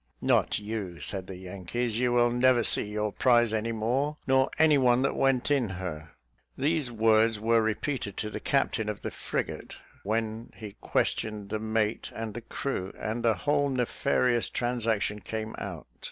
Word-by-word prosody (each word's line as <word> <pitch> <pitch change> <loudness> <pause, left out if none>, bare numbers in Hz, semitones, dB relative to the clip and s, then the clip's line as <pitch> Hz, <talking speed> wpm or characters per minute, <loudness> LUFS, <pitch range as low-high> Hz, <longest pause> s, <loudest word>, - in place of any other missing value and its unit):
"Not - - +3
you," 105 -5 -5
said 95 -2 -6
the 95 - -7
Yankees; 100 +6 -3
"you 125 -1 +2
will 120 0 +4
never 125 0 +4
see - - +4
your 105 0 -2
prize 120 -1 +3
any 110 +1 -1
more, 125 +7 0
nor 130 0 +3
any 155 -3 +5
one 125 0 +4
that 135 - 0
went 135 0 +2
in 130 -7 +2
her." 85 -4 -6 0.5
These 145 -2 0
words 110 -1 +3
were 115 +1 +3
repeated 110 -1 -2
to 105 - -3
the - - -4
captain 115 -5 0
of 105 - -5
the - - -3
frigate, - - -4 0.2
when 110 +2 -3
he 105 -3 -9
questioned 105 -2 -1
the 110 - -2
mate 110 0 -1
and 110 -1 -4
the 120 - -6
crew, 110 -5 -4
and 110 +2 -3
the 115 -2 +3
whole 145 -1 +2
nefarious 125 -1 +1
transaction 115 -4 -1
came 110 +3 -5
out. - - -6
115 Hz, 170 wpm, -28 LUFS, 105-125 Hz, 0.5 s, any